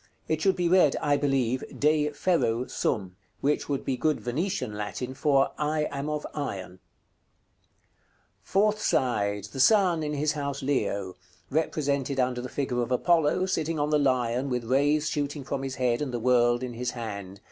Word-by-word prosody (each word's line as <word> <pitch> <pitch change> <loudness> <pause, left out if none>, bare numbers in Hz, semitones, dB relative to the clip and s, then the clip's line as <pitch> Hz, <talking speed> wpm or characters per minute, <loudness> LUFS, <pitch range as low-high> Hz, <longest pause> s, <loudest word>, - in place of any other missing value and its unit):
It 155 0 -1
should 190 +1 +3
be 175 -2 0
read, 175 -5 +5
I 145 -1 +2
believe, 130 -3 0 0.2
"De 150 0 +3
ferro 145 -7 0
sum;" 95 -7 -2 0.2
which 150 +2 0
would 140 -2 -2
be 130 -2 -1
good 155 +4 +1
Venetian 155 - -2
Latin 105 +5 -4
for 135 0 +2
"I 150 0 0
am 140 +1 -3
of 150 -1 -3
iron." 100 -12 -4
§ - - -15
CXI. 90 - -19 1.6
Fourth 210 +2 +1
side. 105 -7 +1
The 135 - -7
Sun, 180 - +4
in 150 -1 -2
his 150 +1 +1
house 140 -2 -4
Leo. 100 -9 -1 0.3
Represented 140 -3 0
under 125 -1 0
the 125 - -6
figure 125 -3 -1
of 120 +1 -3
Apollo, 165 +5 +2
sitting 165 -3 -1
on 150 0 0
the 150 - +4
Lion, 130 -1 +1
with 125 -2 -1
rays 145 +5 +2
shooting 145 -1 -2
from 135 +1 -3
his 135 -1 -4
head, 125 -1 0
and 145 -3 -2
the 120 - -2
world 120 0 +3
in 125 -1 -4
his 120 +1 -3
hand. 100 -4 -6
140 Hz, 180 wpm, -27 LUFS, 125-150 Hz, 1.6 s, read